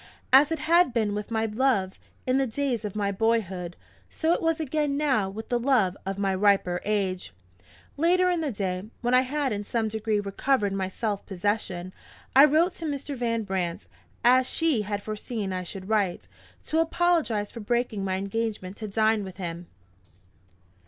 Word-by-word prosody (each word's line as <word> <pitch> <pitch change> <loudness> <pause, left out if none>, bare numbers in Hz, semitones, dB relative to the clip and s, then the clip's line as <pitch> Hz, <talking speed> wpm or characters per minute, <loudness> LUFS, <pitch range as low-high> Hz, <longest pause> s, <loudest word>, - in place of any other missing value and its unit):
As 285 +4 +7
it 325 - 0
had 325 -1 +3
been 215 -3 +1
with 210 0 -4
my 225 -1 0
love, 215 -4 0 0.3
in 255 +1 +2
the 270 - +1
days 245 -1 -1
of 210 -2 -5
my 200 -1 0
boyhood, 195 -5 -1 0.3
so 325 +1 +1
it - - -1
was 325 0 +1
again 295 -1 -1
now 265 -10 +1
with 220 +3 -8
the 245 - +1
love 235 -8 +2
of 195 0 -2
my 195 -1 0
riper 190 -2 +2
age! 190 - -1 0.6
Later 360 +4 +3
in 345 -2 0
the 300 -4 -1
day, 190 -3 -3 0.2
when 245 0 0
I 255 - +6
had 270 -1 -1
in 205 0 -3
some 220 +1 -1
degree 220 -1 -1
recovered 205 +1 0
my 190 -1 -1
self 205 +1 -3
possession, 185 -2 -2 0.4
I 275 +2 +10
wrote 320 +5 +3
to 330 - -5
Mr. 285 -1 -3
Van 230 -2 -1
Brandt 185 -4 -3 0.4
as 255 +2 +5
she 320 -9 +2
had 205 0 -3
foreseen 215 -2 -4
I 185 - -2
should 185 +1 -7
write! 200 - 0 0.4
to 320 - 0
apologize 325 -10 +1
for - - -8
breaking 230 -2 -1
my 190 -1 -1
engagement 200 -1 -3
to 215 - -5
dine 215 +1 +2
with 190 -2 -9
him. 170 -2 -6
220 Hz, 180 wpm, -26 LUFS, 195-270 Hz, 0.6 s, I